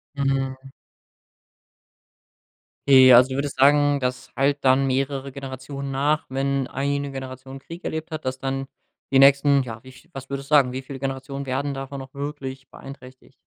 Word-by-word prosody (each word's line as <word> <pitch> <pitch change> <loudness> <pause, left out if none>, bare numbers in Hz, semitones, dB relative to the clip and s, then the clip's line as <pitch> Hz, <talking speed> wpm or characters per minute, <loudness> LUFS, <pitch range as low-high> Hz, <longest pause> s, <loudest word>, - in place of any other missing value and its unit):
Mhm. 135 -1 -1 2.3
Okay, 130 -2 +8
also, 125 +2 +7
du 130 - -4
würdest 140 +1 -3
sagen, 145 +1 +4
das 125 0 -3
hallt 140 +2 +2
dann 135 +1 +4
mehrere 135 +1 -2
Generationen 135 +1 -7
nach, 145 +3 0
wenn 135 0 -1
eine 140 +1 -2
Generation 130 0 -8
Krieg 170 +5 -11
erlebt 160 +1 -4
hat, 155 -2 -6
dass 130 0 -3
dann 135 0 -3 0.4
die 135 - +4
nächsten, 140 0 +5
ja, 115 -2 -8
wie 130 - -12
viel 160 +6 -19
was 135 0 -9
würdest 140 +1 -6
du 150 - +6
sagen, 125 -3 +4
wie 130 - -4
viele 135 0 -9
Generationen 135 +1 -5
werden 135 +2 -2
davon 135 +1 -6
noch 135 0 -11
wirklich 140 -2 -6
beeinträchtigt? 130 -2 -13
135 Hz, 165 wpm, -23 LUFS, 130-140 Hz, 2.3 s, Okay